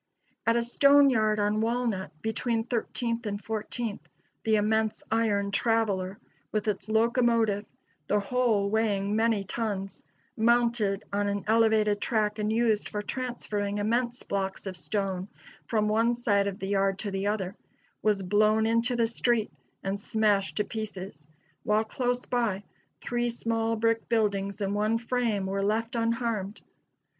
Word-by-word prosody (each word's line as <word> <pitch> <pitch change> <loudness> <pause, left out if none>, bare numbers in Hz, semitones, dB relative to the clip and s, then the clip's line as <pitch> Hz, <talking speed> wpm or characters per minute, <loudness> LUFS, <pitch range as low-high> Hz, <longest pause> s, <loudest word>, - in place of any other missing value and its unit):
At 230 - +4
a 235 - +2
stone 280 +3 +5
yard 215 -3 +2
on 210 +1 +1
Walnut, 230 -4 -1
between 225 +1 0
Thirteenth 235 0 -2
and 205 0 -3
Fourteenth, 220 +1 -4 0.4
the 220 -1 +3
immense 220 +1 +1
iron 205 -3 +1
"traveler," 200 -4 +1 0.3
with 215 0 -1
its 210 0 -2
locomotive 225 -2 +2 0.4
the 210 - +2
whole 215 -2 +1
weighing 210 -2 +1
many 220 -2 +2
tons 195 -2 -4 0.3
mounted 230 -3 +2
on 205 0 +1
an 200 0 -1
elevated 220 -2 +3
track 215 -1 0
and 210 0 0
used 220 -2 +1
for 210 0 -3
transferring 210 -5 -3
immense 235 +4 0
blocks 195 -1 -3
of 190 -1 -4
stone 190 -1 -2 0.4
from 215 -2 +1
one 225 +3 +2
side 205 -4 +1
of 195 -1 -3
the 195 -2 -5
yard 195 -1 +2
to 200 0 -4
the 195 +1 -1
other, 200 -2 -2 0.5
was 210 -2 +1
blown 215 +3 +3
into 230 +2 +1
the 235 -1 +3
street 230 -1 0 0.3
and 195 +1 -2
smashed 210 -2 +1
to 210 - +2
pieces, 195 -8 -7 0.3
while 215 +1 +2
close 245 +2 -2
by, 225 -5 0 0.4
three 240 0 -1
small 230 -1 -1
brick 230 0 0
buildings 205 -3 0
and 200 0 0
one 215 +2 +1
frame 230 -4 -1
were 195 +1 -1
left 225 +4 0
unharmed. 230 -3 -1
215 Hz, 145 wpm, -28 LUFS, 200-230 Hz, 0.5 s, stone